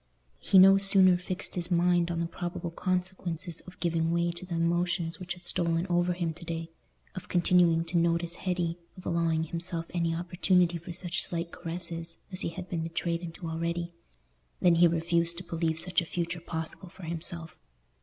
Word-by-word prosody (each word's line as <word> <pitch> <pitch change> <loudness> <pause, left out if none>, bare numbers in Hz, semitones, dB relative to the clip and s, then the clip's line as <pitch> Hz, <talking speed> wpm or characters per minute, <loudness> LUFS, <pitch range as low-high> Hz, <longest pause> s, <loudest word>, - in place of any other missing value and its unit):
He 195 - +3
no 195 +1 +9
sooner 195 -2 +6
fixed 180 +2 -4
his 175 -2 +1
mind 175 -1 +3
on 170 -1 -2
the 170 - 0
probable 170 0 -4
consequences 180 -1 -2
of 180 - -12
giving 165 -1 +1
way 170 0 +1
to 175 +2 -9
the 170 - -3
emotions 170 0 0
which 180 -1 -4
had 180 - -15
stolen 170 -1 +1
over 175 +1 +2
him 170 -2 -2
to 170 - -12
day—of 165 +2 -8
continuing 175 -2 +4
to 170 +1 +1
notice 170 0 +1
Hetty, 175 -2 -1 0.2
of 185 - -12
allowing 165 -2 +1
himself 165 +1 -4
any 170 -2 0
opportunity 175 0 +2
for 175 +2 -8
such 175 +1 -3
slight 170 0 -3
caresses 165 -1 -5
as 185 - -1
he - - -1
had 180 +2 -7
been 170 -3 -2
betrayed 165 +1 -2
into 170 0 -7
already—than 170 +1 -3
he 170 +1 +6
refused 170 0 +1
to 180 - -5
believe 165 -2 -1
such 180 +2 +2
a - - -5
future 170 0 -3
possible 165 +2 -4
for 190 +1 -14
himself. 165 0 -3
170 Hz, 175 wpm, -29 LUFS, 165-180 Hz, 0.2 s, no